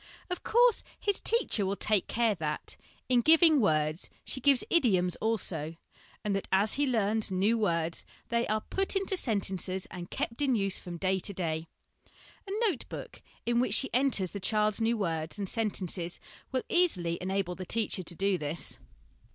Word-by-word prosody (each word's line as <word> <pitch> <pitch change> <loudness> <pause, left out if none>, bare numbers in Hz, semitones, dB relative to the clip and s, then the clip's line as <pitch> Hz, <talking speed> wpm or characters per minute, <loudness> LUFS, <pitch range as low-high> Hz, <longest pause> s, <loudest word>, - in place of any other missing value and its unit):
Of 360 - -2
course, 480 0 +4 0.2
his 405 -1 0
teacher 460 - +1
will 195 +1 -1
take 210 -2 +1
care 230 -2 +2
that, 155 -5 -4 0.3
in 250 -1 +4
giving 320 +2 +6
words, 155 -3 +1 0.2
she 260 - -5
gives 275 -1 +5
idioms 190 - +3
also, 170 -8 0 0.5
and 205 -1 0
that 195 - -3
as 200 +3 +3
he 285 0 +1
learns 220 -3 +1
new 195 +4 +2
words, 170 -6 0 0.3
they 235 0 +1
are 215 +1 0
put 390 - -1
into 390 0 +1
sentences 190 - -1
and 180 -2 -7
kept 230 +5 -3
in 270 -3 +3
use 195 -3 +1
from 175 -1 -7
day 190 +2 +1
to 200 +3 -4
day. 165 -3 -2 0.8
A - - -6 0.2
note 335 - -2
book - - -8 0.2
in 235 0 +2
which 240 -4 +2
she 270 - 0
enters 245 -8 +2
the 200 - -5
child's 210 +2 +1
new 230 +1 +2
words 165 -5 -2
and 200 -2 -2
sentences 185 -5 -2 0.3
will 260 -1 -1
easily 180 - +2
enable 190 -1 -1
the 185 - -7
teacher 215 0 -1
to 170 0 -3
do 195 0 +1
this. 150 +2 -4
205 Hz, 175 wpm, -30 LUFS, 180-240 Hz, 0.8 s, giving